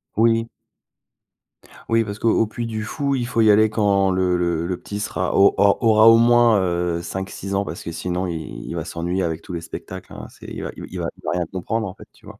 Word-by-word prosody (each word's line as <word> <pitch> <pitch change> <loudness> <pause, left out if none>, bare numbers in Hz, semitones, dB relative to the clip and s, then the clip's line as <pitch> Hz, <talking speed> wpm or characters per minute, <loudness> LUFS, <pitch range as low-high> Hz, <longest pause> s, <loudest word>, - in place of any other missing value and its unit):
Oui. 115 +1 +3 1.4
Oui, 115 0 +3
parce 100 -1 -6
qu'au 115 -1 +2
Puy 120 +2 -5
du 110 -1 -4
Fou, 140 +5 -2
il 125 -3 -1
faut 115 -2 +1
y 110 - +6
aller 110 +1 +5
quand 100 -3 +2
le 90 -1 +1
le 85 -1 0
le 90 0 -2
petit 105 0 -6
sera 110 +1 -2
au 100 - +6
au 100 0 +4
aura, 110 -1 +5
au 115 - +7
moins, 120 -2 +5
heu, 85 -2 -1
5-6 95 +2 -5
ans 100 - +1
parce 85 -3 -7
que 85 - -5
sinon 90 +2 -3
il 80 -3 -6
il - - -6
va 85 -2 -3
s'ennuyer 85 +3 -2
avec 80 -2 -2
tous 90 - -8
les 85 - -4
spectacles 95 +2 -9
hein, - - -8
c'est - - -14
il - - -6
va - - -4
il - - -10
va - - -5
il - - -20
va - - -2
rien 90 -1 -1
comprendre, 110 +6 -3
en 95 - -7
fait, - - -15
tu - - -23
vois? - - -12
100 Hz, 240 wpm, -21 LUFS, 90-115 Hz, 1.4 s, au